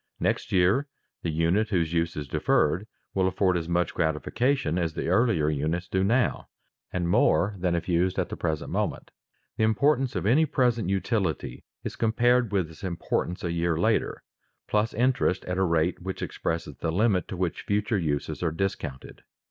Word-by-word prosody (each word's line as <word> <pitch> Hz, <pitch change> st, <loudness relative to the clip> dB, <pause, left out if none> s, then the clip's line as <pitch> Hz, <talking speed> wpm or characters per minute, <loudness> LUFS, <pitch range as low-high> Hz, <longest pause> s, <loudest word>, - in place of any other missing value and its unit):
Next -, -, -1 dB
year 95 Hz, +11 st, +3 dB, 0.3 s
the 85 Hz, -, -2 dB
unit 85 Hz, +7 st, +1 dB
whose 85 Hz, -5 st, 0 dB
use 85 Hz, 0 st, 0 dB
is 75 Hz, -2 st, -4 dB
deferred 80 Hz, +9 st, +1 dB, 0.3 s
will 95 Hz, -1 st, +2 dB
afford 95 Hz, 0 st, +1 dB
as 85 Hz, -1 st, -2 dB
much 90 Hz, 0 st, +1 dB
gratification 85 Hz, -, 0 dB
as 80 Hz, -2 st, -2 dB
the -, -, -2 dB
earlier 95 Hz, -6 st, +3 dB
units 80 Hz, +4 st, -1 dB
do 95 Hz, +1 st, 0 dB
now, 120 Hz, +5 st, +1 dB, 0.4 s
and 90 Hz, -2 st, -1 dB
more 90 Hz, +3 st, +3 dB
than 90 Hz, -1 st, +1 dB
if 85 Hz, 0 st, -3 dB
used 90 Hz, +1 st, +1 dB
at 95 Hz, -, 0 dB
the -, -, -4 dB
present 80 Hz, -3 st, -3 dB
moment. -, -, -2 dB, 0.5 s
The -, -, +1 dB
importance 130 Hz, +4 st, +2 dB
of -, -, -2 dB
any 145 Hz, +9 st, +4 dB
present 120 Hz, -8 st, +1 dB
utility 95 Hz, -, -1 dB, 0.2 s
is -, -, -5 dB
compared 120 Hz, 0 st, +2 dB
with 95 Hz, -5 st, 0 dB
its 80 Hz, -, -15 dB
importance 90 Hz, 0 st, -2 dB
a 85 Hz, -, -1 dB
year 85 Hz, -1 st, 0 dB
later, -, -, 0 dB, 0.4 s
plus 105 Hz, +1 st, +1 dB
interest 125 Hz, -5 st, +1 dB
at 90 Hz, +1 st, -2 dB
a -, -, +3 dB
rate 85 Hz, 0 st, +1 dB
which 95 Hz, +1 st, -5 dB
expresses 80 Hz, 0 st, -3 dB
the 80 Hz, -, -2 dB
limit 95 Hz, -1 st, +2 dB
to 95 Hz, -, -6 dB
which 90 Hz, -2 st, -2 dB
future 105 Hz, +1 st, 0 dB
uses 75 Hz, -4 st, -2 dB
are 85 Hz, -2 st, +1 dB
discounted. 80 Hz, -6 st, -4 dB
90 Hz, 175 wpm, -27 LUFS, 85-105 Hz, 0.5 s, any